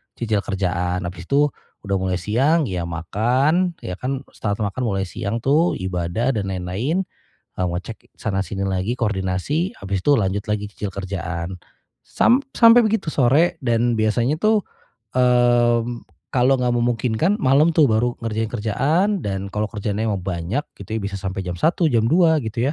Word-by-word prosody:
cicil 110 Hz, -3 st, 0 dB
kerjaan, 90 Hz, -2 st, -2 dB
abis 90 Hz, 0 st, -7 dB
itu 145 Hz, +1 st, +3 dB, 0.3 s
udah 100 Hz, -1 st, -1 dB
mulai 95 Hz, -1 st, -1 dB
siang 135 Hz, -, +2 dB
ya 90 Hz, -2 st, -3 dB
makan, 125 Hz, -, +1 dB
ya 90 Hz, 0 st, -5 dB
kan. 130 Hz, +3 st, -3 dB
Setelah 105 Hz, 0 st, -2 dB
makan 130 Hz, +5 st, -4 dB
mulai 100 Hz, -4 st, 0 dB
siang 105 Hz, +5 st, -4 dB
tuh, 150 Hz, +8 st, +3 dB
ibadah 95 Hz, +5 st, -2 dB
dan 105 Hz, -3 st, -1 dB
lain-lain. 95 Hz, -, -1 dB, 0.6 s
Ngecek 90 Hz, +4 st, -4 dB
sana-sini 95 Hz, -1 st, -2 dB
lagi 95 Hz, +5 st, -1 dB
koordinasi, 105 Hz, -, -1 dB
habis 100 Hz, -1 st, -3 dB
itu 145 Hz, +8 st, +3 dB
lanjut 100 Hz, -3 st, 0 dB
lagi 105 Hz, -1 st, -2 dB
cicil 105 Hz, -, -4 dB
kerjaan. 95 Hz, -2 st, -5 dB, 0.4 s
Sam 245 Hz, +3 st, +2 dB, 0.2 s
sampai 230 Hz, +1 st, +8 dB
begitu 215 Hz, -8 st, 0 dB
sore 150 Hz, +7 st, +3 dB
dan 120 Hz, -2 st, +1 dB
biasanya 120 Hz, +8 st, +1 dB
tuh, 215 Hz, -1 st, +3 dB, 0.5 s
mmm, 120 Hz, -1 st, +2 dB, 0.2 s
kalau 130 Hz, +1 st, +3 dB
enggak 125 Hz, -1 st, 0 dB
memungkinkan, 120 Hz, -, +1 dB
malem 150 Hz, -, +3 dB
tuh 160 Hz, -, +6 dB
baru 120 Hz, +3 st, +1 dB
ngerjain 110 Hz, 0 st, -1 dB
kerjaan 135 Hz, -, +1 dB
dan 100 Hz, -3 st, -4 dB
kalau 105 Hz, 0 st, -1 dB
kerjaannya 105 Hz, 0 st, -2 dB
emang 90 Hz, -, -7 dB
banyak 95 Hz, -, -2 dB, 0.2 s
gitu 105 Hz, +3 st, -4 dB
ya -, -, -2 dB
bisa 100 Hz, -1 st, -4 dB
sampai 95 Hz, 0 st, -4 dB
jam 90 Hz, -1 st, -5 dB
1.00 170 Hz, +2 st, +2 dB
jam 115 Hz, -1 st, +3 dB
2.00 160 Hz, 0 st, +4 dB
gitu 120 Hz, +3 st, -1 dB
110 Hz, 155 wpm, -21 LUFS, 95-135 Hz, 0.6 s, sampai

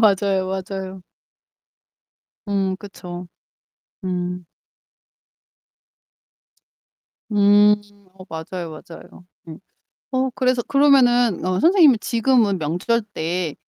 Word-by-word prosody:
맞아요, 195 Hz, -3 st, +2 dB
맞아요. 190 Hz, 0 st, -6 dB, 1.5 s
음 195 Hz, -2 st, -1 dB
그쵸. 180 Hz, -3 st, -9 dB, 0.8 s
음. 180 Hz, -1 st, -3 dB, 2.9 s
음. 205 Hz, 0 st, +5 dB, 0.4 s
어 185 Hz, -, -11 dB
맞아요, 165 Hz, +1 st, -6 dB
맞아요. 165 Hz, +3 st, -13 dB, 0.2 s
음. 160 Hz, -, -9 dB, 0.5 s
어 260 Hz, 0 st, 0 dB
그래서 255 Hz, -2 st, +1 dB
그러면은 245 Hz, -6 st, +3 dB
어 185 Hz, 0 st, 0 dB
선생님은 330 Hz, -, +5 dB
지금은 230 Hz, -5 st, +1 dB
명절 180 Hz, +10 st, -1 dB
때 165 Hz, -2 st, -3 dB
195 Hz, 165 characters per minute, -21 LUFS, 180-235 Hz, 2.9 s, 음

